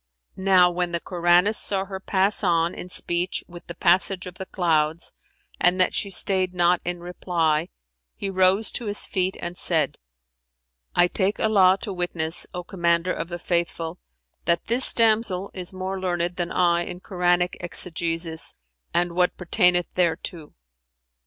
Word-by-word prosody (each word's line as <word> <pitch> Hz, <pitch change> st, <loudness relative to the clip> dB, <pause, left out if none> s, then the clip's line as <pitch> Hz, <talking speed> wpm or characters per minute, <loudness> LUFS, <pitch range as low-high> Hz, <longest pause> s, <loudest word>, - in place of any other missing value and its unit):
Now 190 Hz, -2 st, +4 dB
when 175 Hz, 0 st, -2 dB
the 170 Hz, -, 0 dB
Koranist[FN#383] 175 Hz, +4 st, +2 dB
saw 195 Hz, -3 st, +1 dB
her 190 Hz, -1 st, -7 dB
pass 195 Hz, +2 st, +1 dB
on 170 Hz, -2 st, +2 dB
in 180 Hz, -, -8 dB
speech 175 Hz, 0 st, -1 dB
with 175 Hz, -1 st, -13 dB
the 170 Hz, -, -8 dB
passage 180 Hz, +2 st, +2 dB
of 180 Hz, -1 st, -10 dB
the 190 Hz, -, -6 dB
clouds 160 Hz, -2 st, 0 dB, 0.5 s
and 180 Hz, +1 st, +3 dB
that 185 Hz, -, +3 dB
she 200 Hz, -, -1 dB
stayed 185 Hz, -1 st, +2 dB
not 175 Hz, 0 st, +2 dB
in 175 Hz, 0 st, -4 dB
reply, 170 Hz, -2 st, -1 dB, 0.5 s
he 200 Hz, -, -5 dB
rose 190 Hz, +2 st, +3 dB
to 235 Hz, -, -4 dB
his 205 Hz, 0 st, +1 dB
feet 185 Hz, -1 st, -1 dB
and 175 Hz, +1 st, -5 dB
said, -, -, +1 dB, 1.0 s
"I 175 Hz, -, +5 dB
take 195 Hz, +2 st, -1 dB
Allah 195 Hz, -4 st, +4 dB
to 200 Hz, -, -3 dB
witness, 175 Hz, -2 st, -2 dB
O 180 Hz, -, -5 dB
Commander 170 Hz, 0 st, 0 dB
of 165 Hz, -, -5 dB
the 175 Hz, -, -5 dB
Faithful, 170 Hz, -1 st, -2 dB, 0.5 s
that 170 Hz, 0 st, +1 dB
this 240 Hz, +3 st, +2 dB
damsel 215 Hz, -4 st, +1 dB
is 180 Hz, -1 st, -6 dB
more 190 Hz, 0 st, -4 dB
learned 175 Hz, -1 st, -2 dB
than 175 Hz, -1 st, -3 dB
I 175 Hz, -1 st, +2 dB
in 175 Hz, +1 st, -6 dB
Koranic 180 Hz, -1 st, 0 dB
exegesis 165 Hz, -1 st, -1 dB, 0.4 s
and 175 Hz, 0 st, +1 dB
what 180 Hz, 0 st, +1 dB
pertaineth 180 Hz, 0 st, +2 dB
thereto." 170 Hz, -2 st, -2 dB
180 Hz, 155 wpm, -24 LUFS, 170-190 Hz, 1.0 s, I